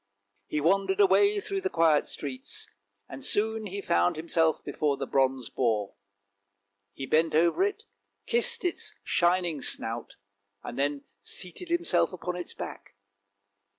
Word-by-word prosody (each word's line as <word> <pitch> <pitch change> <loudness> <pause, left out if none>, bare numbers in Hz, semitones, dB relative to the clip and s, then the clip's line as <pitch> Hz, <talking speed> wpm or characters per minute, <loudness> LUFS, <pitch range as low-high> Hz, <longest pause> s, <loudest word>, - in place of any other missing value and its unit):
He 150 - -1
wandered 195 - +2
away 405 +1 +5
through 395 -1 -2
the 380 - 0
quiet 160 - +3
streets, 130 -3 -4 0.4
and 135 0 -9
soon 220 +3 -1
found 85 +1 +2
himself 160 0 +1
before 145 -2 0
the - - -3
bronze 130 -3 +1
boar; 110 -5 0 1.0
he 135 - -6
bent 155 +2 +2
over 170 - +4
it, 405 +2 -1 0.4
kissed 475 -2 +1
its 350 - -2
shining 175 -4 +1
snout, 115 -1 -2 0.5
and 120 - -6
then 140 0 0 0.2
seated 185 - -6
himself 265 - +2
upon 180 0 -4
its 175 -1 -5
back. - - -8
170 Hz, 130 wpm, -28 LUFS, -, 1.0 s, away